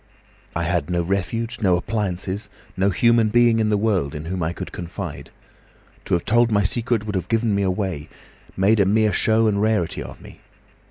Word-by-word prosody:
I 80 - -1
had 85 -2 -1
no 85 -1 0
refuge, 100 +6 -2
no 95 -4 +3
appliances, 100 0 -3 0.3
no 95 +2 +2
human 115 +2 +3
being 120 0 +4
in 110 -1 +1
the 105 - +2
world 100 -10 0
in 75 +1 -6
whom 90 +2 -3
I 80 0 0
could - - -7
confide. 85 -2 -7 0.8
To - - +1
have 85 - -2
told 120 +1 +3
my 100 -1 +3
secret 115 +2 0
would 105 - -4
have 95 - -2
given 115 -2 +1
me 100 - +1
away—made 95 +2 -2
a 100 - +5
mere 110 +1 +3
show 110 0 +3
and 100 -2 +1
rarity 105 -6 0
of - - -9
me. - - -14
100 Hz, 185 wpm, -22 LUFS, 90-110 Hz, 0.8 s, a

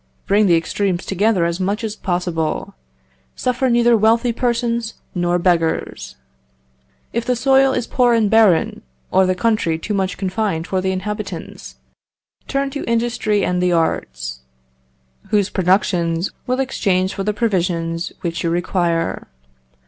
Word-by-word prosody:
Bring 205 +1 +3
the 170 - +5
extremes 180 +2 -1
together 195 -2 +1
as 170 +1 -2
much 200 +5 -1
as 215 -1 -3
possible. 175 -5 -2 0.6
Suffer 255 +1 0
neither 240 0 +4
wealthy 230 +2 +3
persons 235 -2 -1 0.2
nor 175 -1 +1
beggars. 170 -2 0 1.0
"If 235 - -1
the 250 +1 0
soil 270 +2 +4
is 245 -2 -1
poor 245 -2 +2
and 225 -2 +3
barren, 210 -6 +3 0.3
or 190 0 +4
the 185 - +1
country 180 -5 +1
too 210 +6 -4
much 190 -1 -1
confined 190 -3 -2
for 185 0 -1
the 190 0 0
inhabitants, 200 +3 -6 0.7
turn 275 0 -1
to 285 - -4
industry 230 -3 0
and 180 0 0
the 180 -1 +2
arts, 65 - -1 0.9
whose 205 -2 +1
productions 175 -2 +1
you - - -4 0.2
will 255 +1 0
exchange 190 -8 0
for 195 - -3
the 210 - 0
provisions 175 -6 -1
which 170 -1 -3
you 170 - +1
require.... 170 -1 -1
195 Hz, 140 wpm, -19 LUFS, 175-230 Hz, 1.0 s, the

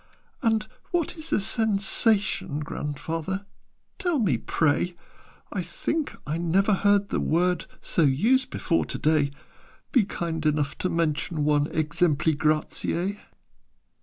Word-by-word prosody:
"And 225 -4 +2 0.2
what 345 -2 -1
is 315 -1 -9
a - - +3
Sensation, 205 - +1
Grandfather, 165 +6 -4 0.5
tell 355 -5 +1
me, 195 - +2
pray? 165 +6 +1 0.6
I - - -1
think 315 -2 -3
I 155 +2 -2
never 190 +5 +2
heard 200 +1 +3
the - - 0
word 180 +1 +1
So - - 0
used 220 - +3
before 165 - 0
to - - -4
day: 155 -2 +2 0.6
Be 245 -7 +4
kind 165 -5 -3
enough 150 -2 0
to 185 - 0
mention 160 -1 0
one 150 -1 +3
'Exempli 155 0 +1
gratiâ.'" 160 +6 0
175 Hz, 125 wpm, -26 LUFS, 155-205 Hz, 0.6 s, Be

